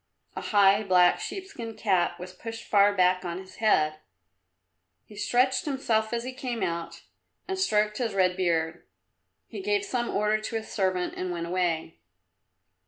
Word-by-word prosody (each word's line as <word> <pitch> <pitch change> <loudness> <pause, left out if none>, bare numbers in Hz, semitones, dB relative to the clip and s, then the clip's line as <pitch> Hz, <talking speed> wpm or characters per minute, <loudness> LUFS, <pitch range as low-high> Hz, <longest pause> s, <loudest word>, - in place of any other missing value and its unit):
A - - -4
high, 200 -1 +4
black 180 -3 +4
sheepskin 370 - -6
cap 195 -5 +1
was 180 +1 -8
pushed 225 +4 -8
far 205 -1 +5
back 185 -1 +2
on 170 -1 -4
his 190 0 -11
head. 155 -8 +2 1.1
He 210 - -15
stretched 250 +5 +1
himself 235 -6 0
as 235 0 -2
he 255 +1 -5
came 250 -5 -4
out 170 -2 -4 0.4
and 380 0 -3
stroked 210 - +1
his 230 -5 -2
red 185 -1 +3
beard. 170 -2 0 0.6
He - - -7
gave 410 0 0
some 245 -9 -2
order 210 +1 +1
to 220 - -5
his 220 0 -4
servant 185 -3 -1
and 185 - -3
went 170 -1 -3
away. 170 -2 -1
205 Hz, 160 wpm, -27 LUFS, 180-235 Hz, 1.1 s, far